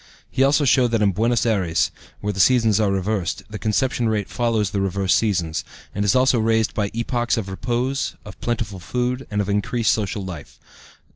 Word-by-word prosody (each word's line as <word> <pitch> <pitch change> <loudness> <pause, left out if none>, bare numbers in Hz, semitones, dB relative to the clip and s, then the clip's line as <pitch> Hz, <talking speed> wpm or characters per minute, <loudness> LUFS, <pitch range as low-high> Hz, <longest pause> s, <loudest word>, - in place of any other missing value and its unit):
He - - -1
also 145 +2 +3
showed 130 -1 +4
that 115 -2 +1
in 100 - +4
Buenos 115 +5 +1
Ayres, 95 -8 +1 0.3
where 105 0 -2
the 95 - -6
seasons 115 -2 +4
are 105 -2 +2
reversed, 95 -2 -1
the 105 - -5
conception 115 +2 0
rate 105 -2 -1
follows 115 -4 0
the 100 - -1
reversed 95 -3 +1
seasons, 85 -4 0 0.3
and 100 - -1
is 105 +4 +2
also 130 -1 +4
raised 110 0 +1
by 100 -2 -1
epochs 120 +1 0
of 110 -4 -3
repose, 120 +7 -2
of 105 - -11
plentiful 110 -5 -2
food, 125 +7 -2
and 105 -2 0
of 100 - -3
increased 105 +3 +1
social 100 -2 -2
life. 85 -6 -9
110 Hz, 190 wpm, -22 LUFS, 100-120 Hz, 0.3 s, showed